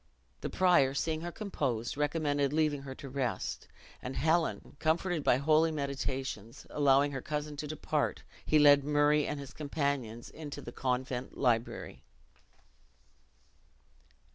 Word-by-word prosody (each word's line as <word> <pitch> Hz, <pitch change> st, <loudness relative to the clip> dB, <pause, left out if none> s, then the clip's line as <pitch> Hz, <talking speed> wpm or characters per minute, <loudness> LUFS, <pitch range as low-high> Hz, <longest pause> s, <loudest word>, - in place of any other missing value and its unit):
The -, -, -4 dB
prior, 175 Hz, -8 st, +4 dB
seeing 160 Hz, +2 st, -1 dB
her 175 Hz, +1 st, -4 dB
composed, 135 Hz, -, -2 dB
recommended 145 Hz, -1 st, 0 dB
leaving 150 Hz, -2 st, +1 dB
her 135 Hz, -1 st, -7 dB
to 140 Hz, -, -9 dB
rest. 130 Hz, -3 st, -3 dB, 0.3 s
And 125 Hz, -, -5 dB
Helen, 160 Hz, +4 st, 0 dB
comforted 165 Hz, 0 st, +1 dB
by 125 Hz, -, +4 dB
holy 155 Hz, +3 st, +3 dB
meditations, 135 Hz, -6 st, -4 dB
allowing 145 Hz, 0 st, +4 dB
her 135 Hz, -2 st, -4 dB
cousin 150 Hz, +1 st, -3 dB
to 150 Hz, +1 st, -4 dB
depart, 150 Hz, -1 st, -1 dB, 0.2 s
he 155 Hz, -, +3 dB
led 145 Hz, -1 st, +7 dB
Murray 145 Hz, +1 st, +3 dB
and 150 Hz, -, -3 dB
his 140 Hz, -2 st, -9 dB
companions 140 Hz, -6 st, -3 dB
into 150 Hz, -2 st, -7 dB
the -, -, -8 dB
convent 130 Hz, 0 st, -2 dB
library. 120 Hz, -3 st, 0 dB
145 Hz, 130 wpm, -31 LUFS, 135-155 Hz, 0.3 s, led